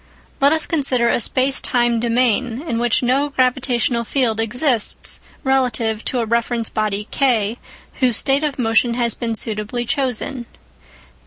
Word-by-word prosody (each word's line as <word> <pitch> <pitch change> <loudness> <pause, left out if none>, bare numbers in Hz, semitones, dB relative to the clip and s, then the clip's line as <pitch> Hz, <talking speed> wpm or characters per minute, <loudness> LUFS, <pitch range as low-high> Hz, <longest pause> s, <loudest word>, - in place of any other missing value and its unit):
Let 280 +1 +4
us 320 0 +1
consider 260 -7 +1
a - - +1
space 260 +3 +2
time 240 -1 +1
domain 240 +2 0
in 235 -9 -3
which 240 +1 +1
no 270 +4 +1
gravitational 250 -3 0
field 230 -2 0
exists 240 +1 +1 0.2
relative 240 -5 0
to 250 - 0
a - - -1
reference 235 0 -1
body 210 -1 -2
K 235 -4 +1 0.4
whose 250 -4 +2
state 275 +2 +1
of 295 -3 -2
motion 235 0 +1
has 235 -2 +1
been 230 -1 -3
suitably 220 +3 -2
chosen. 260 -1 -2
240 Hz, 145 wpm, -19 LUFS, 230-265 Hz, 0.4 s, Let